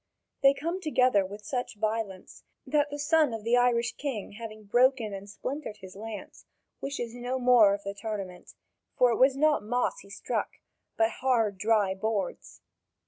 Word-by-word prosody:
They 275 Hz, 0 st, +6 dB
come 335 Hz, +7 st, -3 dB
together 255 Hz, -, +3 dB
with 205 Hz, +2 st, -9 dB
such 245 Hz, +1 st, -3 dB
violence 215 Hz, -3 st, -4 dB, 0.2 s
that 295 Hz, -1 st, +1 dB
the 290 Hz, -, -5 dB
son 295 Hz, -3 st, +2 dB
of 220 Hz, -, -7 dB
the 230 Hz, +2 st, +3 dB
Irish 240 Hz, -1 st, +3 dB
king 265 Hz, -8 st, -4 dB
having 215 Hz, 0 st, -9 dB
broken 240 Hz, 0 st, +2 dB
and 195 Hz, +1 st, -8 dB
splintered 255 Hz, 0 st, -5 dB
his 190 Hz, -1 st, -12 dB
lance, 215 Hz, 0 st, -9 dB, 0.3 s
wishes 245 Hz, -4 st, -4 dB
no 245 Hz, +1 st, -3 dB
more 245 Hz, -5 st, +6 dB
of 200 Hz, -, -11 dB
the 200 Hz, -, -4 dB
tournament; 200 Hz, -4 st, -6 dB, 0.4 s
for 250 Hz, -1 st, +5 dB
it 230 Hz, -, 0 dB
was 265 Hz, +1 st, +5 dB
not 305 Hz, +1 st, +3 dB
moss 245 Hz, -, -1 dB
he -, -, -15 dB
struck, -, -, -3 dB, 0.4 s
but 225 Hz, 0 st, +3 dB
hard, 225 Hz, -7 st, +1 dB
dry 210 Hz, -2 st, +2 dB
boards. 200 Hz, 0 st, -3 dB
230 Hz, 165 wpm, -28 LUFS, 205-260 Hz, 0.4 s, They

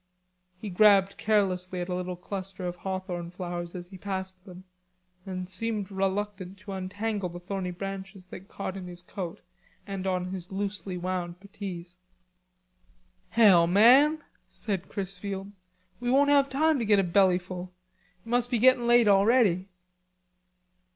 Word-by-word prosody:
He 205 Hz, -1 st, -6 dB
grabbed 195 Hz, 0 st, +5 dB
carelessly 185 Hz, -4 st, +1 dB
at 175 Hz, -, -3 dB
little 180 Hz, 0 st, -3 dB
cluster 185 Hz, 0 st, -6 dB
of 175 Hz, 0 st, -4 dB
hawthorn 185 Hz, -2 st, -4 dB
flowers 175 Hz, -1 st, -5 dB
as 175 Hz, -1 st, -7 dB
he 190 Hz, -1 st, -11 dB
passed 190 Hz, -1 st, -5 dB
them, 185 Hz, -1 st, -11 dB, 0.6 s
and 185 Hz, -1 st, -4 dB
seemed 205 Hz, +1 st, -3 dB
reluctant 195 Hz, 0 st, -2 dB
to 200 Hz, +1 st, -10 dB
untangle 195 Hz, +1 st, -3 dB
the 175 Hz, +1 st, -8 dB
thorny 185 Hz, 0 st, -4 dB
branches 195 Hz, +1 st, -6 dB
that 190 Hz, -, -9 dB
caught 195 Hz, -2 st, -5 dB
in 185 Hz, -2 st, -7 dB
his 175 Hz, 0 st, -7 dB
coat 180 Hz, -2 st, -6 dB, 0.4 s
and 195 Hz, -1 st, -4 dB
on 180 Hz, -1 st, -1 dB
his 185 Hz, -1 st, -7 dB
loosely 195 Hz, -1 st, -3 dB
wound 180 Hz, -1 st, -3 dB
puttees. 185 Hz, -3 st, -8 dB, 1.3 s
"Hell, 190 Hz, -7 st, +6 dB
man," 255 Hz, -, +6 dB, 0.3 s
said 195 Hz, -5 st, -4 dB
Chrisfield, 195 Hz, 0 st, -4 dB, 0.5 s
"we 245 Hz, 0 st, -2 dB
won't 285 Hz, +3 st, +4 dB
have 280 Hz, -1 st, +4 dB
time 305 Hz, +2 st, +2 dB
to 230 Hz, -, -1 dB
get 210 Hz, -1 st, +4 dB
a 195 Hz, -, +3 dB
bellyful. 180 Hz, 0 st, +1 dB, 0.5 s
It -, -, -16 dB
must 245 Hz, +1 st, +1 dB
be 245 Hz, -, +1 dB
gettin' 245 Hz, 0 st, +4 dB
late 240 Hz, -1 st, +5 dB
already." 200 Hz, -2 st, +4 dB
190 Hz, 145 wpm, -28 LUFS, 180-205 Hz, 1.3 s, Hell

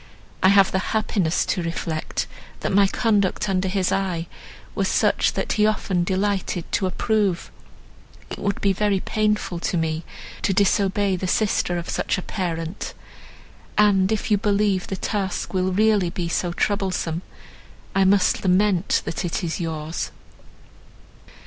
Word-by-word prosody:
I -, -, +5 dB
have 195 Hz, -1 st, +5 dB
the 190 Hz, -, +1 dB, 0.2 s
happiness 195 Hz, -6 st, 0 dB
to 180 Hz, -, -1 dB
reflect, 165 Hz, -1 st, -3 dB, 0.4 s
that -, -, -1 dB
my 200 Hz, 0 st, +5 dB
conduct 205 Hz, -3 st, +1 dB
under 190 Hz, -1 st, 0 dB
his 185 Hz, -1 st, 0 dB
eye 180 Hz, -4 st, -1 dB, 0.5 s
was -, -, 0 dB
such -, -, +2 dB
as -, -, 0 dB
he 210 Hz, 0 st, +3 dB
often 195 Hz, -4 st, 0 dB
delighted 190 Hz, -2 st, -1 dB
to 190 Hz, -, +1 dB
approve. 195 Hz, -1 st, 0 dB, 0.8 s
It -, -, -5 dB
would 200 Hz, 0 st, -1 dB
be 200 Hz, -1 st, +3 dB
very 200 Hz, 0 st, +1 dB
painful 210 Hz, -4 st, -1 dB
to 175 Hz, -, -1 dB
me 160 Hz, 0 st, -1 dB, 0.4 s
to 195 Hz, -, +1 dB
disobey 200 Hz, -1 st, +2 dB
the 185 Hz, -, -3 dB
sister 180 Hz, -3 st, +1 dB
of 170 Hz, -, -5 dB
such -, -, -1 dB
a 185 Hz, -, -4 dB
parent, 170 Hz, -1 st, -4 dB, 0.8 s
and, 200 Hz, -2 st, +4 dB
if 220 Hz, 0 st, -1 dB
you 205 Hz, -, +4 dB
believe 205 Hz, -3 st, +1 dB
the 195 Hz, -, -3 dB
task 195 Hz, 0 st, -3 dB
will 185 Hz, 0 st, +1 dB
really 205 Hz, -2 st, +3 dB
be 175 Hz, -1 st, -3 dB
so 175 Hz, +1 st, -1 dB
troublesome, 180 Hz, -3 st, -1 dB, 0.7 s
I 195 Hz, -, +3 dB
must 190 Hz, 0 st, +3 dB
lament, 185 Hz, -1 st, +2 dB
that -, -, -3 dB
it 175 Hz, +1 st, -2 dB
is 165 Hz, +1 st, -2 dB
yours." 160 Hz, -1 st, -3 dB
190 Hz, 150 wpm, -23 LUFS, 175-205 Hz, 0.8 s, I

